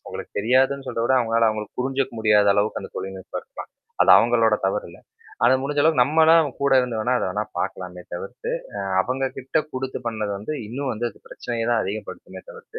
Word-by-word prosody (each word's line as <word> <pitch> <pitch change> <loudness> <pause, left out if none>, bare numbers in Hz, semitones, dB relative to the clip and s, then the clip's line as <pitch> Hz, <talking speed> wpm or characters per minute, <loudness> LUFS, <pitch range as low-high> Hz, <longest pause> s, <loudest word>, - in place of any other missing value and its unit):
அவங்களுக்கு - - -8
தெரியாதுன்னு 130 +5 +2
சொல் - - -3
விட 120 - +2
அவவுங்களால 115 -2 +3
அவங்களுக்கு 110 +1 -5
புரிஞ்சுக்க 135 -1 -1
முடியாத 105 -2 +4
அளவுக்கு 105 +2 0
அந்த - - -9
தொழில்நுட்பம் 95 -1 -6
இருக்கலாம். - - -11 0.3
அது - - +4
அவங்களோட 115 0 +3
தவறு 95 +2 -1
இல்ல. 85 - -14 0.5
அது 130 - +6
முடிஞ்ச 145 +1 -1
அளவுக்கு 155 -4 +4
நம்மலாம் 160 +3 +5
கூட 140 0 +2
இருந்து 125 -3 -3
வேணா, 125 +4 +1
அத - - -2
வேணா 105 +3 -1 0.2
பார்கலாமே 90 -1 -5
தவிர்த்து, 95 - -6 0.3
அ - - -3 0.2
அவங்க 130 +7 -1
கிட்ட 135 +5 -1
குடுத்து 130 0 -4
பண்ணது 110 -3 -2
வந்து 105 +9 -5
இன்னும் 130 +5 -3
வந்து 115 +2 -2
அது 110 - -16
பிரச்சனைய 115 -2 -4
தான் 120 -2 +2
அதிகப்படுமே 105 +3 -7
தவிர்த்து. 465 -2 -11
120 Hz, 190 wpm, -23 LUFS, 105-135 Hz, 0.5 s, அது